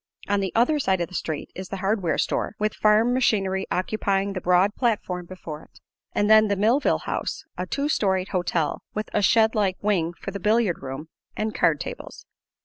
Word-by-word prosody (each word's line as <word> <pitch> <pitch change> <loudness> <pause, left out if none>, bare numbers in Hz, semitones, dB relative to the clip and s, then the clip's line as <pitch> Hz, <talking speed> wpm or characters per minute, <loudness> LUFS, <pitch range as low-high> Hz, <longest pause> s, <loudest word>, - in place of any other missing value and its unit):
On 205 0 +1
the 195 -1 -2
other 250 +7 +3
side 190 -8 +1
of 170 - -2
the - - -15
street 155 -4 -4
is 185 0 -7
the 195 - -4
hardware 190 -4 0
store, - - -1
with 215 0 0
farm 215 +3 +3
machinery 195 -6 +1
occupying 195 +1 0
the 185 - -4
broad 180 +3 +3
platform 195 -8 -1
before 165 -4 -8
it, - - -19 0.3
and 205 - +1
then 215 0 +6
the 200 - +1
Millville 225 +8 +2
House, - - -3
a - - -4
two 280 +1 -1
storied 190 -9 +1
"hotel" 170 -4 -1
with 215 +1 -4
a 210 - +2
shed 220 +2 +4
like 200 -4 +1
wing 175 -5 0
for 195 - -5
the 200 - -5
billiard 210 -2 +1
room 135 +4 -7 0.3
and 215 0 -1
card 155 -3 +2
tables. - - -8
195 Hz, 195 wpm, -24 LUFS, 180-215 Hz, 0.3 s, then